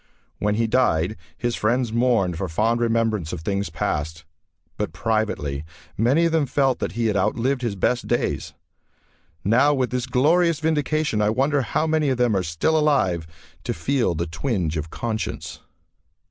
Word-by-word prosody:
When 105 0 +1
he 115 +1 +1
died 110 -6 +2 0.2
his 120 -1 -1
friends 120 +1 0
mourned 115 -7 +2
for 95 +2 -3
fond 115 +8 +1
remembrance 115 -7 0
of 85 - -5
things 100 +3 -2
past, 80 +2 -3 0.5
but - - -3
privately 90 -7 -1 0.3
many 135 +10 +3
of 165 - +2
them 160 -3 +2
felt 135 0 +1
that 85 - -3
he 115 +1 -1
had 105 -2 +1
outlived 120 +7 +1
his 115 -5 -2
best 120 +6 0
days. 120 - -1 0.9
Now 130 +9 +4
with 130 -2 0
this 125 0 -2
glorious 160 +6 +3
vindication, 155 -5 0
I 105 - +3
wonder 135 +5 +1
how 155 +5 0
many 155 -2 +1
of 130 - 0
them 120 -3 +2
are 95 - +2
still 85 - 0
alive 95 - +1 0.4
to - - -3
feel 120 - 0
the 85 +2 -1
twinge 85 - -2
of 80 0 -3
conscience.... 110 +2 -4
115 Hz, 165 wpm, -23 LUFS, 95-135 Hz, 0.9 s, Now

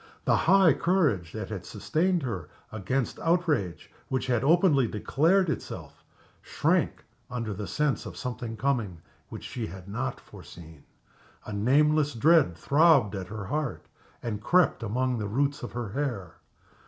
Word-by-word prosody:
The - - +4
high 185 -2 +5
courage 150 - +1
that 110 -3 -5
had 100 -5 -5
sustained 165 - -1
her 95 - -4 0.2
against 110 +5 -2
outrage 165 - 0 0.2
which 130 0 -1
had 125 -2 0
openly 155 -4 +4
declared 165 - +2
itself 160 - -6 0.4
shrank - - 0 0.2
under 115 -4 -3
the 105 0 -6
sense 150 - -1
of - - -9
something 120 -3 -5
coming 115 -11 -1 0.3
which - - -8
she 120 -3 -5
had 95 +2 -10
not 120 +6 -3
foreseen. 80 -4 -14 0.6
A 105 - -6
nameless 145 +6 +2
dread 145 - +4
throbbed 145 - +4
at 95 -2 -5
her 110 0 -6
heart 150 +5 -3 0.4
and 105 -3 -3
crept 175 +6 +3
among 125 +3 -1
the 105 - -3
roots 140 +6 0
of 120 - -7
her 120 -3 -4
hair. 115 - -4
125 Hz, 145 wpm, -27 LUFS, 105-150 Hz, 0.6 s, high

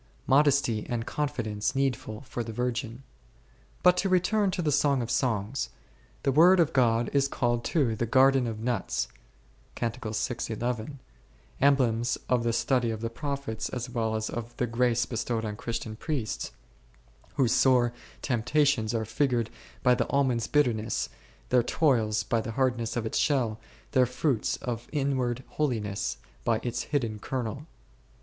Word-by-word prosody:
J^otJcsiT) 135 -5 +3
antf 120 -2 -2
ccnffoence 120 -5 -2
netful 135 -3 -2
for 120 -1 -4
t^e 115 - -6
Utrgfrt. 125 0 -2 0.8
But 180 0 +7
to 195 - +1
return 190 +3 +2
to 180 -1 -2
the 150 - +1
Song 145 -1 +3
of 115 - -4
Songs: 120 0 0 0.5
the 135 - +2
Word 175 +6 +6
of 165 -2 +3
God 115 -3 +2
is 140 -1 +3
called 120 -3 0
too 130 -8 +1
the 115 +2 -2
garden 130 +1 +4
of 110 -2 -4
nuts 110 - -1 0.7
<i, 120 -1 0 1.7
emblems 120 -4 +3
of 125 -2 +2
the 115 - +1
study 120 +1 +1
of 110 -1 -4
the 115 0 -3
prophets 140 -4 -4
as 125 0 -5
well 110 -2 -1
as 110 0 -2
of 120 0 -6
the 125 - +1
grace 120 0 +1
bestowed 115 -1 -2
on 105 -1 -3
Christian 115 -1 -4
priests, 125 -3 -3 0.9
whose 125 -4 +2
sore 125 -2 +4 0.3
temptations 120 -2 +1
are 110 -1 -1
figured 120 -2 0 0.3
by 125 - +6
the - - 0
almond's 130 -5 +1
bitterness, 120 -7 +1 0.4
their 125 -1 +5
toils 115 -6 +2
by 115 +2 0
the 115 0 -5
hardness 125 -3 0
of 115 - -1
its 110 - -1
shell, 120 -7 +1 0.3
their 130 -1 +4
fruits 125 -1 0
of 120 -1 -4
inward 130 -4 0
holiness 110 -9 -2 0.3
by 110 - +2
its 120 0 -2
hidden 115 -7 -1
kernel. 130 +5 -4
120 Hz, 150 wpm, -28 LUFS, 115-135 Hz, 1.7 s, But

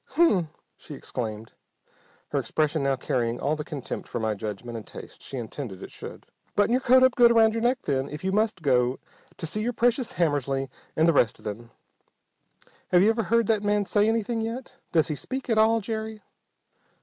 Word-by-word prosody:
"Hm 335 -6 +5
m!" 170 -4 -1 0.3
she 150 - -10
exclaimed, 110 -4 -5 0.8
her - - 0
expression 155 0 0
now 135 0 +2
carrying 120 -2 -1
all 150 +2 0
the 150 - -4
contempt 145 -4 -6
for - - -4
my 110 -1 0
judgment 105 +3 -6
and 110 -3 -7
taste - - -11
she 135 - -7
intended 115 -4 -6
it - - -9
should. - - -9 0.3
"Button 205 +2 +3
your 255 +2 +3
coat 260 0 +6
up 260 -1 +5
good 240 -1 +7
around 225 -1 +5
your 230 - -2
neck, 250 +2 +1
then, 135 -1 -1
if 150 +3 -7
you 190 - 0
must 210 -3 0
go 125 -2 +2 0.4
to - - -4
see 175 +7 -3
your 240 +3 -1
precious 240 +1 +1
Hammersly 140 -5 0 0.3
and 160 +1 +4
the 165 - +5
rest 120 -6 +3
of - - -19
them. 115 +3 -6 1.2
Have 180 0 +5
you 215 - +5
ever 225 -1 -1
heard 230 +2 +3
that 215 -1 +2
man 205 0 +1
say 210 +2 +2
anything 225 0 0
yet? 230 +3 -5
Does 160 -3 +3
he 150 - -1
speak 260 - -5
at 220 - +3
all, 225 +1 +4
Jerry?" 220 0 -5
180 Hz, 205 wpm, -26 LUFS, 135-225 Hz, 1.2 s, good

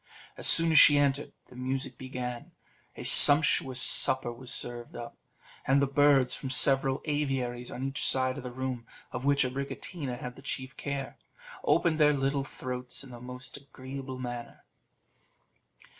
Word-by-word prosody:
As - - +1
soon 165 0 +6
as 155 - +6
she 145 - +7
entered, 140 0 -1 0.2
the 125 - -17
music 130 +1 -5
began, 125 -2 -8 0.4
a - - -10
sumptuous 145 -3 +8
supper 130 -2 +2
was 125 +1 -8
served 120 -1 -5
up, 120 0 -10 0.5
and 135 +1 +2
the 140 - +1
birds 140 -2 +2
from 135 - -7
several 135 0 0
aviaries 135 -5 -4
on 125 - -8
each 135 +1 -3
side 130 0 -1
of - - -11
the 125 - -7
room, 125 -2 -6 0.2
of 125 - -7
which 140 0 +1
Abricotina 135 +1 -7
had 125 0 -9
the - - -15
chief 130 -1 -6
care, 140 -2 -7 0.5
opened 160 -2 0
their 150 -1 +3
little 140 0 -2
throats 125 -1 -7
in 135 - -13
the 120 -1 -12
most 125 +1 -9
agreeable 135 -1 -10
manner. 120 -2 -9
130 Hz, 160 wpm, -27 LUFS, 125-140 Hz, 0.5 s, sumptuous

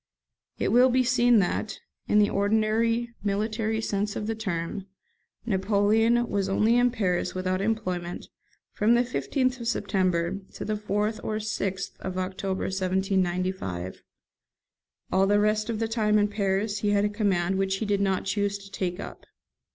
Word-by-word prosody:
It - - 0
will 250 +2 +6
be 255 +1 +3
seen 245 -1 +4
that, 205 +2 0 0.3
in 210 - +3
the 210 -1 +4
ordinary 220 +3 +1
military 215 +2 -1
sense 205 -1 -2
of 210 - -3
the 225 - -1
term, 195 -3 -4 0.6
Napoleon 220 +3 +2
was 195 -3 -1
only 215 +4 +3
in 245 0 +4
Paris 190 -9 -1
without 185 0 -1
employment 185 -5 -2 0.4
from 220 +3 +3
the 240 - +4
15th 255 +1 -1
of 235 - -5
September 190 -5 0 0.2
to - - -5
the 215 - -1
4th 210 +1 -2
or 215 - -2
6th 200 -3 -3
of 185 -1 -5
October 190 +1 -2
1795; 185 - -1 1.1
all 190 +1 +3
the 205 +1 +4
rest 215 +1 +1
of 225 - -1
the 225 +1 -1
time 215 -2 +2
in 205 0 +2
Paris 200 0 -1
he 205 - 0
had 205 0 +3
a - - +3
command 195 -3 0
which 195 0 +1
he 220 - -3
did 200 -1 +1
not 195 -1 0
choose 200 +1 0
to 195 0 -14
take 180 -2 -3
up. - - -9
205 Hz, 160 wpm, -26 LUFS, 190-220 Hz, 1.1 s, will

